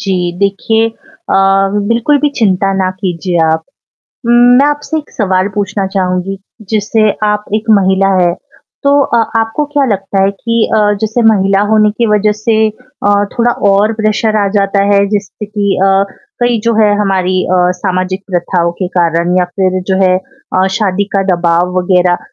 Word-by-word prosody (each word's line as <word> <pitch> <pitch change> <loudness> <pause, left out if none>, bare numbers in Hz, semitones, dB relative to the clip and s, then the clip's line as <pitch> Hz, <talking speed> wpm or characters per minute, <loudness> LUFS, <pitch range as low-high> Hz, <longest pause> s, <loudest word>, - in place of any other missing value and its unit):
जी 180 -3 -1
देखिए, 210 +3 +1
अ, 315 +8 -8 0.5
बिल्कुल 235 +6 +2
भी 295 - +2
चिंता 195 -3 +1
ना 190 -1 0
कीजिए 180 -1 -2
आप। 160 0 0 0.6
उम, 235 - +3 0.3
मैं 280 - +4
आपसे 295 +2 -2
एक 300 - -10
सवाल 190 -2 0
पूछना 205 -1 -2
चाहूँगी। 190 0 -2 0.3
जैसे 215 0 +1
आप 210 0 0
एक 220 +1 -1
महिला 190 0 +2
हैं, 175 -1 +1 0.5
तो 285 0 +3
अ, 235 - 0 0.2
आपको 225 +7 -2
क्या 290 -1 +2
लगता 195 -3 -1
है 195 - +2
कि 230 +3 -1
अ, - - +3 0.2
जैसे 220 +2 -1
महिला 195 -2 +1
होने 215 -1 +3
की 230 +3 -1
वजह 210 -1 +2
से 215 +1 -1
अ, 215 -3 -2
थोड़ा 240 +1 +2 0.2
और 205 +3 +2
प्रेशर 215 0 0
आ - - 0
जाता 195 0 +1
है। 200 0 +3
जिससे 210 +1 -4
कि 205 -1 -1
अ, 195 0 +3 0.4
कई 240 -2 +1
जो 230 0 +1
है 210 -1 +3
हमारी 185 -2 0
अ, 185 - 0 0.2
सामाजिक 185 +1 -2
प्रथाओं 175 -1 0
के 180 - -1
कारण 170 +1 +1
या 180 - +2
फिर 185 -1 0
जो - - +2
है 185 0 +3
अ, 190 -4 -3
शादी 200 -2 0
का 195 - +2
दबाव 175 +1 0
वग़ैरह। 180 -1 +2
200 Hz, 170 wpm, -12 LUFS, 185-220 Hz, 0.6 s, मैं